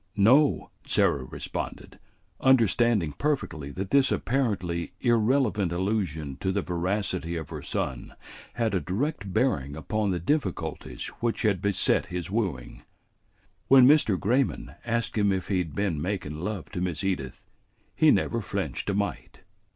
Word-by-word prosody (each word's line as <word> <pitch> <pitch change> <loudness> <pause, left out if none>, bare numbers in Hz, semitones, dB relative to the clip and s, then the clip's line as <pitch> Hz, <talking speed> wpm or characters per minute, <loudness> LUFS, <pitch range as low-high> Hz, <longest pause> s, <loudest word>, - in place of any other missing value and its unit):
"No," 130 +9 +4 0.2
Sarah 70 -3 +2
responded, - - -6 0.4
understanding 115 - +3
perfectly 80 - -2
that 95 +1 -5
this 140 -1 +4
apparently 95 -10 -1
irrelevant 115 -5 +2
allusion 85 -7 -2
to 95 - -1
the 100 -1 -1
veracity 90 -1 -2
of 80 -3 -5
her - - -5
son 65 -2 -4 0.4
had 115 -3 0
a 95 - +2
direct 100 - -3
bearing 75 - 0
upon 105 +6 -1
the 90 - 0
difficulties 90 - -2
which 115 -1 -1
had 100 -5 +2
beset 100 -2 +1
his 90 0 -5
wooing; 95 - -2 0.9
"when 130 -2 +8
Mr. 130 - +5
Grayman 125 +6 0
asked 115 -1 -1
him 100 -1 +3
if 95 -1 -2
he 95 -2 +2
had 80 -5 -4
been 90 -7 -1
makin' 85 -5 -3
love 95 -5 -4
to 90 - -4
Miss 90 -1 -2
Edith, 90 -10 -3 0.5
he - - +5
never - - +2
flinched - - -3
a 100 - 0
mite. 100 0 -3
100 Hz, 145 wpm, -27 LUFS, 85-115 Hz, 0.9 s, when